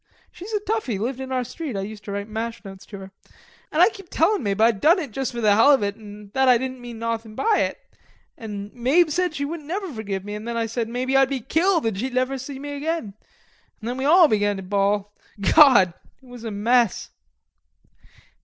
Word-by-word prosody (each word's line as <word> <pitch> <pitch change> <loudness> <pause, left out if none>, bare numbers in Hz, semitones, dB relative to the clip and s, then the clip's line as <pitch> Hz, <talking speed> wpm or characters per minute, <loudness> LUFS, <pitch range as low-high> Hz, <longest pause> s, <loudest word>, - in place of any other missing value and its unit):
She 355 - -11
was 440 - -8
a 420 - +1
toughie, 420 - -2
lived 245 +6 -3
in 265 0 -6
our 255 -1 0
street, 265 +1 -6
I - - -2
used 210 +1 -8
to 205 - -6
write 200 +1 -4
mash 225 +1 -5
notes 195 -1 -11
to. 200 -2 -9
An' 190 - -12 0.6
I 350 +6 +5
kep' 390 -5 -13
tellin' 380 +5 +2
Mabe 200 -3 -2
I'd 225 -2 +3
done 330 +5 +5
it 305 -9 -4
juss 265 +4 -2
for 240 -1 -5
the 210 -2 +4
hell 225 +7 +6
of 270 -7 +4
it, 200 0 -2
an' 210 -2 -12
that 265 -1 +3
I 250 - +6
didn't 260 +1 -5
mean 240 -1 -8
nawthin' 225 -1 -4
by 430 - +2
it. - - -1 0.6
An' 205 -2 -7
Mabe 285 +7 +2
said 355 0 0
she 285 - -2
wouldn't 305 0 -6
never 370 -1 -4
forgive 200 -4 -5
me, 205 - -6
an' 210 +1 -6
then 235 0 -3
I 230 - 0
said 225 0 -3
maybe 255 +3 -1
I'd 270 -1 +5
be 275 -1 -2
killed 335 - +1
an' 225 - +1
she'd 250 +7 -4
never 255 +1 0
see 270 +1 -7
me 290 +2 -7
again, 285 -6 -3 0.7
an' 220 - -10
then 245 +2 -3
we 265 - -2
all 340 +3 +7
began 205 -4 +1
to 195 - -7
bawl. 200 +1 0 0.3
Gawd! 200 -1 +6 0.3
it 265 - -23
was 245 -2 -11
a 225 - -4
mess.... 230 +1 +1
245 Hz, 230 wpm, -23 LUFS, 210-285 Hz, 0.7 s, all